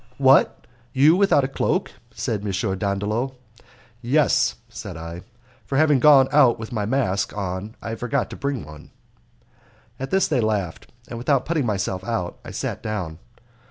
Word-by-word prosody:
"What! 135 0 +4 0.3
you 145 +5 +5
without 195 -7 +4
a - - +1
cloak!" 135 - -1 0.2
said 105 -3 -3
M. 105 - -3 0.3
Dandolo. 105 +6 -1 0.7
"Yes," 140 +5 +2
said - - -8
I; 85 +2 -7 0.4
"for 135 - -3
having 150 -3 +4
gone 135 -1 +7
out 140 -5 +5
with 110 0 -8
my 105 -4 -2
mask 110 -6 -1
on 100 +2 -4
I 115 - -4
forgot 120 +3 -1
to - - -6
bring 140 - -3
one." 75 0 -13 1.1
At 135 - -4
this 190 0 +2
they 135 -6 +1
laughed, 105 -6 -2 0.2
and, 115 - -7
without 135 +1 +1
putting 155 -6 0
myself 95 -2 -2
out, 100 -6 -3
I - - -9
sat - - -4
down. 90 -7 -4
115 Hz, 160 wpm, -23 LUFS, 100-140 Hz, 1.1 s, gone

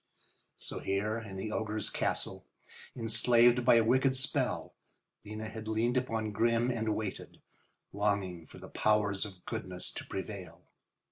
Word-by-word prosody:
So, - - -4
here 105 +3 -1
in 105 -4 -8
the 100 +3 -4
ogre's 110 -1 -1
castle, - - -1 0.5
enslaved 120 +1 +4
by 125 -1 +6
a 115 - +6
wicked 130 +3 +3
spell, 135 - +1 0.5
Lena 110 +1 -6
had 110 0 -7
leaned 115 +3 +1
upon 115 -4 -1
Grimm 115 +3 +2
and 110 -2 -1
waited, 105 -3 -5 0.5
longing 100 -5 -1
for - - -13
the - - -10
powers 105 -1 +1
of 95 -3 -15
goodness 95 -6 -5
to - - -6
prevail. 95 -4 -6
110 Hz, 140 wpm, -32 LUFS, 100-115 Hz, 0.5 s, by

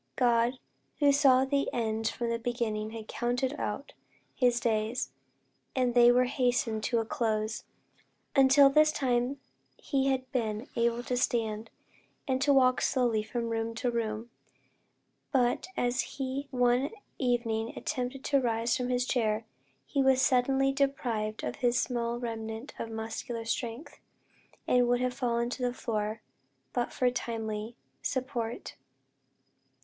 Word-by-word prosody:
God, 240 0 +3 0.4
who 290 -1 +5
saw 270 -2 +5
the 280 +1 0
end 225 -1 -1
from 235 0 -2
the 230 - -1
beginning 225 -3 -2
had 220 -1 -8
counted 245 +3 -1
out 275 +7 -4 0.4
his 245 -2 +2
days, 225 +1 -1 0.6
and 250 -2 +2
they 240 0 +7
were 250 +1 +4
hastening 245 -4 0
to 235 +2 0
a 225 - +1
close. 220 -1 -1 0.7
Until 275 0 +7
this 305 +2 +5
time 255 -1 0 0.4
he 275 -2 0
had 260 -1 -1
been 225 -2 -2
able 235 0 +1
to 250 - -2
stand, 225 -3 -1 0.6
and 260 -1 0
to 285 +1 +4
walk 255 -2 +4
slowly 240 -5 +2
from 230 +2 -3
room 225 0 -2
to 245 +2 -1
room; 230 0 -3 1.0
but 250 +4 +2
as 245 +2 +1
he 270 +1 -4
one 250 +1 +2 0.3
evening 235 -3 0
attempted 260 -1 -3
to 280 -1 +2
rise 230 -1 +1
from 250 -1 -2
his 250 0 +1
chair, 220 -3 0 0.4
he 275 - 0
was 265 -1 +4
suddenly 270 +1 +3
deprived 240 -6 -1
of 125 - -3
his 245 0 +2
small 235 -1 -1
remnant 225 +1 -5
of 230 - -4
muscular 225 +1 -5
strength, 235 +3 -4 0.7
and 245 -1 +4
would 245 0 +2
have 250 0 0
fallen 235 -2 0
to 255 - -5
the 245 0 0
floor, 215 -2 -2 0.5
but 245 -1 -1
for 250 -1 +1
timely 225 -2 -4 0.3
support. 245 - -3
245 Hz, 140 wpm, -30 LUFS, 225-260 Hz, 1.0 s, they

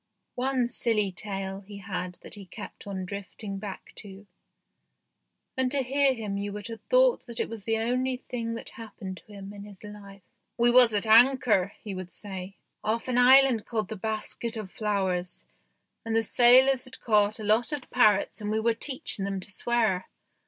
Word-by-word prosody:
One 255 -1 0
silly 225 -4 +1
tale 195 0 -5
he 205 +1 -11
had 180 -2 -5
that - - -8
he 200 -3 -10
kept 205 +2 -10
on 190 -2 -4
drifting 200 +1 -7
back 200 -1 -8
to, 200 -1 -10 1.3
and 260 -1 +1
to 275 0 0
hear 270 +1 +2
him 205 -4 -4
you 205 0 -3
would 210 +2 -6
have 225 -1 -8
thought - - +3
that 235 -1 -7
it - - 0
was 220 -3 -8
the 225 0 +1
only 250 +3 0
thing 230 -2 -5
that 230 - -6
happened 205 -5 -9
to - - -17
him 200 0 -9
in 200 -1 -9
his 205 -1 -14
life. 200 -2 -11 0.3
"We 240 0 +5
was 245 -1 +8
at 205 - 0
anchor," 225 -4 +5
he 210 -3 -5
would 185 -1 -7
say, 195 -1 -7
" - - -52
off 225 +3 -1
an 250 -1 +1
island 255 -2 +6
called 215 -4 -2
the 220 - -4
Basket 220 +2 -4
of 205 -4 -6
Flowers, 190 -4 -2 0.6
and 225 0 -2
the 225 - +3
sailors 255 +3 +5
had 255 - -10
caught 210 -1 +2
a - - -6
lot 220 +6 +2
of 290 -4 -4
parrots 215 -3 +3
and 210 - -3
we 215 +1 0
were 230 +1 +2
teaching 230 -4 -3
them 195 0 -2
to 195 +2 -6
swear. 220 -4 0
215 Hz, 190 wpm, -27 LUFS, 200-240 Hz, 1.3 s, was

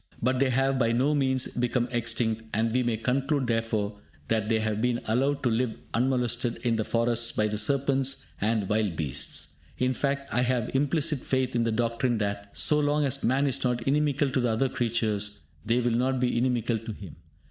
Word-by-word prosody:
But 130 +2 +1
they 135 -1 +3
have 135 +1 +1
by 115 -2 +2
no 135 +5 +2
means 130 -3 +1
become 120 0 0
extinct, 115 -1 -1
and 110 +1 +1
we 125 - +2
may 120 -2 0
conclude, 135 +4 0
therefore, 115 -3 -1 0.3
that 110 -1 0
they 110 -1 +2
have 110 -1 -1
been 120 0 +1
allowed 135 +6 +1
to 125 - +3
live 115 0 0 0.2
unmolested 120 -1 0
in 115 -1 +2
the 110 - 0
forests 115 +1 +1
by 105 - +1
the 105 0 -2
serpents 135 0 +1 0.2
and 105 -1 +1
wild 105 -4 0
beasts. 70 -3 -4 0.2
In 130 +1 +1
fact, 140 +1 -2
I 125 - +2
have 125 -2 0
implicit 145 +2 +1
faith 130 -1 -1
in 115 -1 +2
the 115 - +1
doctrine 115 +1 0
that, 100 -1 -3
so 150 - +4
long 145 0 +2
as 135 - -1
man 130 +4 +2
is 135 -2 0
not 125 -2 0
inimical 145 0 +1
to 130 - +1
the 120 -1 +1
other 115 +4 +1
creatures, 105 -4 -1 0.2
they 115 +3 +1
will 120 -1 +1
not 130 +3 +1
be 125 -1 +1
inimical 120 -2 +1
to 115 0 -7
him. 95 -7 -11
120 Hz, 200 wpm, -27 LUFS, 110-130 Hz, 0.3 s, so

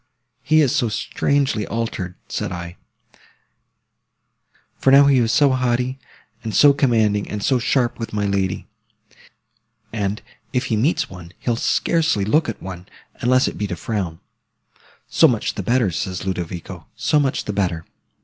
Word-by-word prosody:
He 155 +2 +4
is 140 -1 +2
so 120 -6 +1
strangely 115 +1 0
altered, 100 -5 -3
said - - -3
I: 85 0 -6 2.0
for - - +1
now 140 +1 +8
he 140 -2 +4
is 115 -1 +2
so 145 +1 +4
haughty, 130 0 0 0.4
and 110 -2 -4
so 145 -1 +7
commanding, 110 -7 +1
and 105 -1 -4
so 130 -2 +2
sharp 120 0 0
with 115 - -5
my 105 -1 -1
lady; 95 -2 -1 1.3
and, 105 -1 -2 0.3
if 125 0 0
he - - +3
meets 130 +11 +1
one, 90 -2 -11
he'll 120 - -1
scarcely 155 -3 +1
look 150 +6 +2
at 115 - -7
one, 90 0 -8 0.3
unless 130 +2 +3
it - - -5
be 105 - -1
to - - -4
frown. 95 -7 -3 0.9
So - - +5
much - - -1
the - - -4
better, 120 -5 +1
says 90 +3 -4
Ludovico, 90 -2 -5
so 150 - +2
much 135 -2 0
the 105 - -3
better. 90 -5 -1
115 Hz, 155 wpm, -21 LUFS, 95-130 Hz, 2.0 s, now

